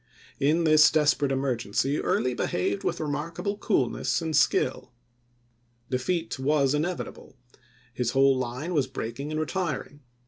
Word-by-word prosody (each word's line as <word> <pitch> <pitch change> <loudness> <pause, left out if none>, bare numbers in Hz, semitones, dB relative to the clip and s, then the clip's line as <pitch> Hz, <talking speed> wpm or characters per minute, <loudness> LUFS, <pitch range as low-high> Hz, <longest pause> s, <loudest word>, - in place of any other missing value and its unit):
In 155 +5 +2
this 155 -1 +6
desperate 145 -2 +2
emergency 130 0 0
Early 125 +1 0
behaved 100 -2 -1
with - - -1
remarkable 160 +7 -3
coolness 205 0 0
and 160 -2 -2
skill. - - +1 1.0
Defeat 165 +5 -1
was 140 0 +2
inevi 170 +5 -1
table; - - -13 0.6
his 125 -2 -1
whole 135 +1 +4
line 130 +7 -3
was 145 -5 +1
breaking 130 +2 -5
and 155 0 -2
retiring. 155 -3 -3
145 Hz, 130 wpm, -26 LUFS, 130-160 Hz, 1.0 s, this